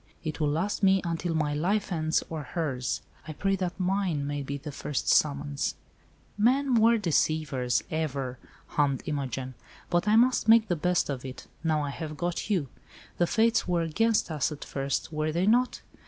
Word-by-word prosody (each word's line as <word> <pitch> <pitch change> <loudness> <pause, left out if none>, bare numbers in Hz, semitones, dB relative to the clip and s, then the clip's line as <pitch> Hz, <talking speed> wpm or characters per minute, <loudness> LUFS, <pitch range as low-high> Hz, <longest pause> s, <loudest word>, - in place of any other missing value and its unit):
It 155 -1 -4
will 150 -2 +2
last 170 +9 -1
me 195 -1 +5
until 165 0 -2
my 150 -2 0
life 190 +8 0
ends 160 -2 +1
or 160 -2 -4
hers. 140 -5 -3 0.2
I 155 - -5
pray 195 +6 0
that 180 0 -3
mine 185 -5 0
may 145 0 -2
be 140 +1 -4
the 145 +2 -7
first 145 0 -3
summons." 145 -1 +1 0.6
"Men 260 +5 +3
were 230 0 +5
deceivers, 155 - +1
ever," 140 -5 -2 0.3
hummed 140 -3 0
Imogen. 135 -3 -3 0.4
"But 175 +3 +1
I 210 - +5
must 245 0 +4
make 225 -1 +6
the 175 - +2
best 180 +2 +1
of 130 -2 -5
it, 130 -1 -8 0.2
now 155 -2 +1
I 145 - -3
have 155 0 -6
got 175 +5 -2
you. 180 -9 +1 0.5
The 175 - +3
Fates 230 +4 +2
were 175 -2 +1
against 210 +4 +1
us 155 0 0
at 150 - -7
first, 135 +3 -3
were 155 0 0
they 170 +4 +1
not? 245 +4 +2
160 Hz, 180 wpm, -28 LUFS, 145-195 Hz, 0.6 s, make